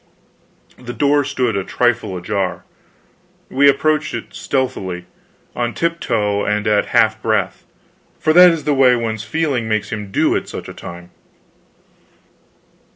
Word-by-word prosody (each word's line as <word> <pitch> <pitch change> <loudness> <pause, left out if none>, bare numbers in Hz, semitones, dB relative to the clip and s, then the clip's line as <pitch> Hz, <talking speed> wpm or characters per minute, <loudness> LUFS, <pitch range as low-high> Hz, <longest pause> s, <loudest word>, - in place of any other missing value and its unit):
The 120 -1 -7
door 145 0 +2
stood 125 -5 -1
a 100 - -1
trifle 120 -4 0
ajar. 95 +1 -3 0.9
We 140 +2 +5
approached 155 0 +1
it 115 - -7
stealthily 95 -10 -3 0.5
on 120 -2 -2
tiptoe 110 -12 0
and 105 0 -1
at 105 -1 +2
half 110 -2 +2
breath 110 -5 -1 0.5
for 155 - +1
that 180 +1 +9
is 165 -3 -1
the 150 - +1
way 130 -2 +5
one's 115 -2 -3
feeling 130 -1 -1
makes 110 -1 -1
him 105 -2 -5
do, - - +2
at - - -3
such - - -7
a - - -8
time. 85 0 -10
115 Hz, 140 wpm, -18 LUFS, 105-140 Hz, 0.9 s, that